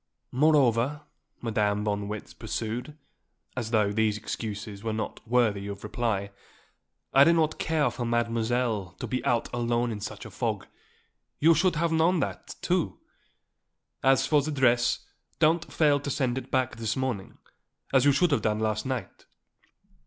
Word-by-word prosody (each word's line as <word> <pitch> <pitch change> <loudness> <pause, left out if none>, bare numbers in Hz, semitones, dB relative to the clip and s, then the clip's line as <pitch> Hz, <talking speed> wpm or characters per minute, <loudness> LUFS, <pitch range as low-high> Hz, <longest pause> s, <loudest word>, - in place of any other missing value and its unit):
"Moreover," 140 -1 +3 0.4
Madame 105 -2 +1
von 105 -1 0
Marwitz 105 0 -6
pursued, 120 +7 -4 0.6
as 120 -4 -3
though 105 -3 +2
these 105 0 +1
excuses 105 -1 -5
were 115 - -1
not 110 0 -4
worthy 110 -5 +2
of 100 -1 -7
reply, 105 -2 -2 0.8
"I 135 - +8
do 170 - +5
not 155 -2 +1
care 155 -5 +1
for 120 +1 -4
Mademoiselle 115 -3 0
to - - -3
be 130 - -2
out 120 -2 +1
alone 120 0 0
in 105 - -4
such 105 - -6
a - - -9
fog. - - -2 0.7
You 165 +3 +6
should 175 +2 +2
have 165 +2 +1
known 165 +2 +3
that, 100 -9 -4
too. - - 0 1.0
As 135 0 +4
for 150 -2 +3
the 150 - -4
dress, 125 -4 +2 0.3
don't 165 +1 +2
fail 145 -3 +3
to 140 - -5
send 130 -3 0
it 130 - -12
back 130 -2 0
this 110 -2 -1
morning 130 -7 -3 0.6
as 130 -2 +5
you 145 - +6
should 165 +5 +3
have 140 - +2
done 105 -1 +1
last 110 +1 -1
night." 130 -3 -5
120 Hz, 160 wpm, -27 LUFS, 110-145 Hz, 1.0 s, I